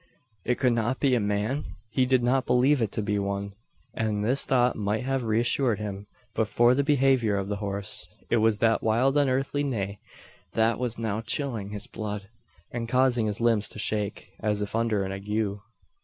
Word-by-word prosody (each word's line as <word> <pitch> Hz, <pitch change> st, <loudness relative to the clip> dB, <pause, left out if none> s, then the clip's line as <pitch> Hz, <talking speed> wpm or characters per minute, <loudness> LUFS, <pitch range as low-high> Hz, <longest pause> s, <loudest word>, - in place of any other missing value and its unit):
It 125 Hz, -, 0 dB
could 125 Hz, -3 st, +2 dB
not 120 Hz, +3 st, 0 dB
be 135 Hz, -3 st, +3 dB
a 125 Hz, -, +3 dB
man? 105 Hz, +7 st, -2 dB, 0.2 s
He 130 Hz, +2 st, +2 dB
did 130 Hz, -2 st, +3 dB
not 130 Hz, +2 st, +2 dB
believe 125 Hz, +3 st, +3 dB
it 110 Hz, -3 st, 0 dB
to 110 Hz, -, -1 dB
be 105 Hz, 0 st, 0 dB
one; 100 Hz, 0 st, -3 dB, 0.4 s
and 105 Hz, -3 st, -1 dB
this 130 Hz, +4 st, +3 dB
thought 125 Hz, -2 st, +3 dB
might 105 Hz, +2 st, -1 dB
have 135 Hz, 0 st, -1 dB
reassured 115 Hz, +1 st, +2 dB
him, 100 Hz, -1 st, -6 dB, 0.3 s
but 110 Hz, -, 0 dB
for 120 Hz, +3 st, +4 dB
the 140 Hz, +2 st, +2 dB
behaviour 135 Hz, -6 st, +3 dB
of 100 Hz, 0 st, -3 dB
the 105 Hz, -, -2 dB
horse. 100 Hz, -1 st, -2 dB, 0.2 s
It -, -, +2 dB
was 110 Hz, -1 st, +3 dB
that 115 Hz, +1 st, +2 dB
wild 120 Hz, +5 st, +2 dB
unearthly 140 Hz, 0 st, +1 dB
neigh, 100 Hz, -7 st, -3 dB, 0.5 s
that 115 Hz, +1 st, +2 dB
was 125 Hz, -2 st, -2 dB
now 110 Hz, -1 st, -2 dB
chilling 115 Hz, -4 st, -3 dB
his 105 Hz, -1 st, -5 dB
blood, 105 Hz, -2 st, -5 dB, 0.4 s
and 115 Hz, -1 st, -4 dB
causing 125 Hz, -3 st, +3 dB
his 105 Hz, 0 st, -2 dB
limbs 115 Hz, -3 st, +2 dB
to -, -, -8 dB
shake, 105 Hz, -1 st, -3 dB
as 105 Hz, -1 st, 0 dB
if 105 Hz, -, -5 dB
under 115 Hz, -3 st, +1 dB
an 95 Hz, -, -4 dB
ague. 100 Hz, +1 st, -2 dB
115 Hz, 190 wpm, -27 LUFS, 105-125 Hz, 0.5 s, for